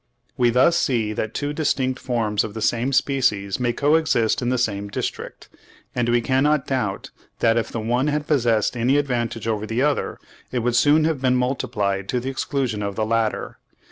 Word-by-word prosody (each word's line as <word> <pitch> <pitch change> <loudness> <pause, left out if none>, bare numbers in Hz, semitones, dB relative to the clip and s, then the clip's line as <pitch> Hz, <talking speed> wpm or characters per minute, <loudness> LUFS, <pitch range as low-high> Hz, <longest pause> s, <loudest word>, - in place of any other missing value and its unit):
We 120 -1 +3
thus 130 +8 +4
see 115 -5 0
that 110 +1 -4
two 145 0 -2
distinct 135 -4 0
forms 110 -4 0
of 105 -1 -7
the 110 - -5
same 120 +4 +1
species 125 -8 +1
may 120 -1 +1
co 145 +5 +1
exist 140 -7 +2
in 120 - -1
the 130 - +1
same 100 -4 -1
district, 100 - -5 0.5
and 120 -1 0
we 120 0 +3
cannot 135 +4 +2
doubt 105 -8 -2 0.3
that 115 -1 +3
if 115 - -1
the 115 - -3
one 120 +5 0
had 150 0 -1
possessed 120 -7 +1
any 125 +4 +2
advantage 120 -5 -2
over 110 -1 -1
the 115 +4 0
other, 145 -1 0 0.3
it 125 -2 -1
would 120 -1 +1
soon 150 +5 +4
have 155 -4 0
been 130 -1 +2
multiplied 105 -6 -1
to 125 - 0
the 130 +2 -4
exclusion 130 -5 -2
of 100 -1 -3
the 110 - 0
latter. 115 0 -1
120 Hz, 195 wpm, -22 LUFS, 110-135 Hz, 0.5 s, thus